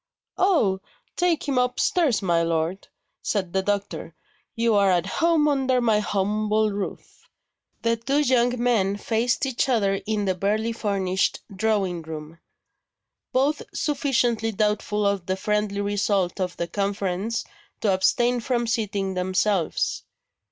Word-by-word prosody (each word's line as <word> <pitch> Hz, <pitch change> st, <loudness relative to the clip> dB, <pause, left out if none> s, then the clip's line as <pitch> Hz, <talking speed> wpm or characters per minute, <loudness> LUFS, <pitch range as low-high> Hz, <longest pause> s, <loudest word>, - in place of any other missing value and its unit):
"Oh, 230 Hz, -, +3 dB, 0.3 s
take 350 Hz, -4 st, +1 dB
him 270 Hz, -3 st, +2 dB
upstairs, 250 Hz, -, +1 dB
my 170 Hz, -2 st, +2 dB
lord," 165 Hz, +3 st, -1 dB, 0.3 s
said 185 Hz, -5 st, -2 dB
the 190 Hz, -, +2 dB
doctor; 200 Hz, +1 st, -3 dB, 0.4 s
"you 230 Hz, -1 st, +2 dB
are 200 Hz, -1 st, +4 dB
at 175 Hz, -2 st, +2 dB
home 320 Hz, -, +2 dB
under 265 Hz, -3 st, +2 dB
my 225 Hz, -3 st, +3 dB
humble 210 Hz, +1 st, 0 dB
roof!" 200 Hz, -1 st, -7 dB, 0.5 s
The 230 Hz, 0 st, +2 dB
two 275 Hz, +6 st, +1 dB
young 245 Hz, -3 st, +2 dB
men 210 Hz, -5 st, +2 dB
faced 230 Hz, +5 st, 0 dB
each 265 Hz, +1 st, 0 dB
other 200 Hz, -5 st, +1 dB
in 215 Hz, -2 st, 0 dB
the 190 Hz, -, +1 dB
barely 210 Hz, +5 st, 0 dB
furnished 195 Hz, -4 st, 0 dB
drawing 195 Hz, -4 st, 0 dB
room; 160 Hz, 0 st, -8 dB, 0.9 s
both 280 Hz, +4 st, +1 dB
sufficiently 245 Hz, -6 st, +1 dB
doubtful 210 Hz, 0 st, 0 dB
of 200 Hz, -3 st, 0 dB
the 185 Hz, 0 st, 0 dB
friendly 210 Hz, 0 st, -1 dB
result 200 Hz, -2 st, 0 dB
of 180 Hz, -1 st, -2 dB
the 170 Hz, -, -2 dB
conference 200 Hz, +3 st, -2 dB, 0.4 s
to 205 Hz, -3 st, +2 dB
abstain 240 Hz, +6 st, +2 dB
from 240 Hz, 0 st, -1 dB
seating 205 Hz, -4 st, -1 dB
themselves. 185 Hz, 0 st, 0 dB
210 Hz, 130 wpm, -24 LUFS, 190-240 Hz, 0.9 s, are